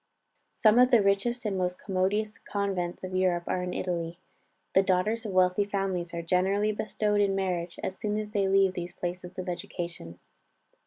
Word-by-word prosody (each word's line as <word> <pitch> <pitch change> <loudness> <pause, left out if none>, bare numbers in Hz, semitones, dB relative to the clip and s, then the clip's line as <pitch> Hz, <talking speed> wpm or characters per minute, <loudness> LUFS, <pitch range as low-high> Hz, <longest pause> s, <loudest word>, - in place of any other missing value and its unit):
Some 220 0 +5
of 250 0 +6
the 235 -5 +5
richest 210 +5 +1
and 205 -2 0
most 180 -1 -1
commodious 205 +3 -1
convents 190 -4 -3
of 185 0 -5
Europe 185 -2 +2
are 180 - -1
in 180 0 -3
Italy. 170 -2 -3 0.6
The 190 - +6
daughters 205 +5 +1
of - - -4
wealthy 185 +1 +3
families 195 -4 -2
are 170 0 -4
generally 190 +5 +2
bestowed 210 0 0
in 195 -1 +2
marriage 180 -3 -2
as 190 - -4
soon 210 0 -1
as 210 -1 -4
they 200 -2 +1
leave 195 -1 +4
these 175 -1 -5
places 180 0 -5
of 185 - -4
education. 170 - -5
190 Hz, 175 wpm, -28 LUFS, 180-205 Hz, 0.6 s, of